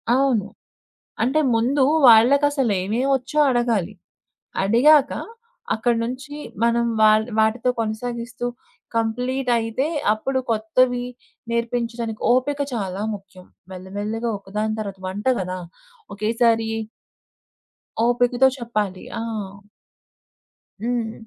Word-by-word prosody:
అవును. 260 -7 +2 0.8
అంటే, 270 +7 +2
ముందూ 255 +5 +2 0.3
వాళ్ళకసలేమేవొచ్చో 255 +1 +3
అడగాలి. 230 -6 0 0.7
అడిగాక 270 +8 +5 0.6
అక్కడి 235 +1 +1
నుంచి 255 +5 -6 0.3
మనం 235 0 +2 0.2
వాళ్ 215 0 +5
వాటితో 220 +3 +2
కొనసాగిస్తూ, 235 +2 -4 0.5
కంప్లీటయితే, 245 +2 0 0.3
అప్పుడు 260 +5 -2
కొత్తవీ 245 +3 +1 0.5
నేర్పించడానికి, 235 -1 -2
ఓపిక 280 +3 0
చాలా 195 -4 -3
ముఖ్యం. 190 -2 -14 0.3
మెల్లమెల్లగా 205 +5 -4
ఒక 195 -1 -18
దాని 215 0 -1
తర్వాత 200 -3 -5
వంట 200 +3 -5
గదా! 185 0 -4 0.6
ఒకేసారి 225 +1 +2 1.4
ఓపికతో 245 +2 +3
చెప్పాలి. 210 -6 -3 0.2
ఆ! - - -3 1.6
హ్మ్. 235 -2 -1
235 Hz, 85 wpm, -22 LUFS, 215-250 Hz, 1.6 s, అడిగాక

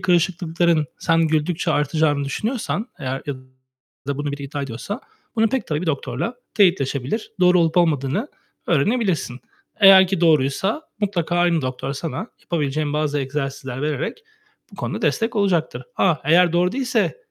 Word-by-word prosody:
kırışıklıkların 170 -2 +1
sen 165 -1 +2
güldükçe 160 +2 0
artacağını 150 -1 +1
düşünüyorsan, 220 - -2
eğer 135 -2 -4
ya 145 - -2 0.7
da 140 0 -2
bunu 145 0 -2
biri 140 0 -6
iddia 140 +1 -4
ediyorsa 135 - -5 0.4
bunu 225 0 +4
pek 265 +2 -2
tabii 150 -1 -1
bir - - -4
doktorla 160 - -2 0.2
teyitleşebilir, 175 - +1
doğru 180 0 +5
olup 165 0 +1
olmadığını 165 - +1 0.4
öğrenebilirsin. 170 - 0 0.4
Eğer 195 -2 +9
ki 185 -1 -2
doğruysa 165 - +2 0.2
mutlaka 180 -4 -1
aynı 175 -3 +2
doktor 130 +1 -3
sana 165 - -4
yapabileceğin 150 -2 -2
bazı 150 -1 0
egzersizler 135 -1 -4
vererek 150 - -2 0.5
bu - - -13
konuda - - -4
destek 225 0 0
olacaktır. 175 - 0
A! 175 -5 +3
Eğer 170 +3 +4
doğru 180 +1 +2
değilse 255 - 0
165 Hz, 140 wpm, -21 LUFS, 140-190 Hz, 0.7 s, Eğer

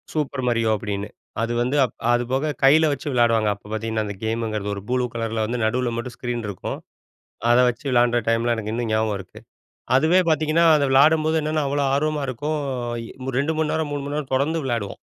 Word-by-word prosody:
Super 140 -4 -2
Mario 115 -2 +1
அப்படின்னு. 100 0 -4 0.3
அது 115 +1 -1
வந்து, 125 +4 0 0.4
அது 120 0 +2
போக 140 +4 0
கையில 150 +4 +6
வச்சு 140 +1 -4
விளையாடுவாங்க 115 -3 +3
அப்போ 100 - -18
பார்த்தீங்கன்னா 110 0 -2
அந்த 100 -1 -5
கேம்ங்கிறது, 110 -2 -2
ஒரு 100 - -6
ப்ளூ 125 0 +1
கலர்ல 115 -1 -2
வந்து 120 +3 -3
நடுவில் 120 +1 0
மட்டும் 120 0 -5
ஸ்க்ரீன் 120 -2 -3
இருக்கும். 95 - -5 0.7
அதை 120 +1 +6
வச்சு 120 +1 -4
விளையாடுற 120 -1 +3
டைம்ல 115 +1 +2
எனக்கு 110 -1 -4
இன்னும் 120 -1 -2
ஞாபகம் 110 -1 +1
இருக்கு. 95 - -12 0.6
அதுவே 160 +7 +4
பார்த்தீங்கன்னா 155 +1 +2
அத 150 - +2
விளையாடும்போது 155 +4 +4
என்னென்னா 155 0 0
அவ்ளோ 140 +1 0
ஆர்வமா 150 +1 0
இருக்கும். 150 +5 -2 0.8
2 150 +3 0
மணி 155 -1 +1
நேரம், 160 -2 -1
3 145 -1 -2
மணி 145 +1 -4
நேரம் 145 -3 -4
தொடர்ந்து 150 +5 +1
விளையாடுவோம். 115 -6 -3
125 Hz, 185 wpm, -23 LUFS, 115-145 Hz, 0.8 s, கையில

